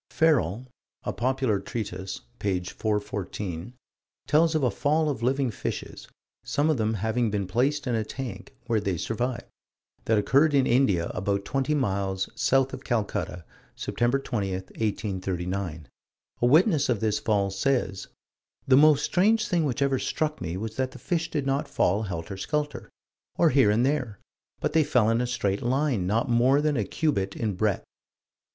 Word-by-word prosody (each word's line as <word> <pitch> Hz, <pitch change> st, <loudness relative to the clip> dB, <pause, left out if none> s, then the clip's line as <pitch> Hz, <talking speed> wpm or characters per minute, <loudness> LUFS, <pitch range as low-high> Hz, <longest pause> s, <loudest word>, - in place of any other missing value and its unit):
Ferrel 125 Hz, -, +2 dB, 0.4 s
(A -, -, -3 dB
Popular 130 Hz, -4 st, 0 dB
Treatise, 95 Hz, -2 st, -5 dB, 0.2 s
p. 95 Hz, -3 st, 0 dB
414) 100 Hz, 0 st, -4 dB, 0.5 s
tells 160 Hz, +2 st, +3 dB
of 155 Hz, -, +1 dB
a 125 Hz, -, +3 dB
fall 155 Hz, +2 st, +1 dB
of 130 Hz, -, -5 dB
living 130 Hz, +1 st, +1 dB
fishes -, -, -5 dB, 0.4 s
some 150 Hz, +2 st, +1 dB
of 150 Hz, -, 0 dB
them 110 Hz, 0 st, 0 dB
having 110 Hz, +3 st, 0 dB
been 100 Hz, -2 st, -1 dB
placed 125 Hz, +10 st, 0 dB
in 125 Hz, -, -1 dB
a 110 Hz, -1 st, +1 dB
tank, 130 Hz, +3 st, -7 dB
where 115 Hz, -3 st, +1 dB
they 95 Hz, -4 st, -1 dB
survived 120 Hz, +6 st, -2 dB, 0.6 s
that 110 Hz, -, +3 dB
occurred 140 Hz, +8 st, +3 dB
in 135 Hz, -2 st, +4 dB
India, 120 Hz, -10 st, +2 dB
about 100 Hz, +1 st, -1 dB
20 135 Hz, +5 st, 0 dB
miles 95 Hz, -7 st, -1 dB
south 135 Hz, 0 st, +2 dB
of -, -, -7 dB
Calcutta, 105 Hz, -6 st, -2 dB, 0.3 s
Sept. 120 Hz, +3 st, 0 dB
20, 100 Hz, -6 st, -2 dB
1839. 95 Hz, -4 st, -3 dB, 0.5 s
A -, -, +4 dB
witness 155 Hz, -, +4 dB
of 120 Hz, -4 st, +1 dB
this 105 Hz, -1 st, 0 dB
fall 100 Hz, -3 st, +1 dB
says: 100 Hz, -2 st, -1 dB, 0.6 s
"The 130 Hz, -, +6 dB
most 150 Hz, 0 st, +5 dB
strange 215 Hz, +4 st, +2 dB
thing 170 Hz, -5 st, +1 dB
which 140 Hz, 0 st, 0 dB
ever 135 Hz, -2 st, +1 dB
struck 155 Hz, -1 st, -2 dB
me 85 Hz, +1 st, -3 dB
was 110 Hz, +2 st, -5 dB
that 130 Hz, -1 st, 0 dB
the -, -, -12 dB
fish 165 Hz, -2 st, -2 dB
did 145 Hz, -3 st, -2 dB
not 135 Hz, +1 st, 0 dB
fall 100 Hz, +4 st, +1 dB
helter 95 Hz, -2 st, -5 dB
skelter, 150 Hz, +7 st, -3 dB, 0.5 s
or 170 Hz, -2 st, +4 dB
here 130 Hz, -5 st, +5 dB
and 110 Hz, +4 st, +3 dB
there, 130 Hz, -7 st, -1 dB, 0.4 s
but -, -, -1 dB
they 160 Hz, -1 st, +5 dB
fell 115 Hz, -6 st, +3 dB
in 115 Hz, +1 st, +2 dB
a 125 Hz, -, -1 dB
straight 100 Hz, -5 st, -1 dB
line, 125 Hz, -6 st, 0 dB
not 110 Hz, +4 st, +1 dB
more 125 Hz, +4 st, +4 dB
than 150 Hz, 0 st, +1 dB
a 110 Hz, -5 st, 0 dB
cubit 100 Hz, -12 st, -1 dB
in 110 Hz, -3 st, -1 dB
breadth." 100 Hz, +1 st, 0 dB
120 Hz, 165 wpm, -26 LUFS, 100-140 Hz, 0.6 s, The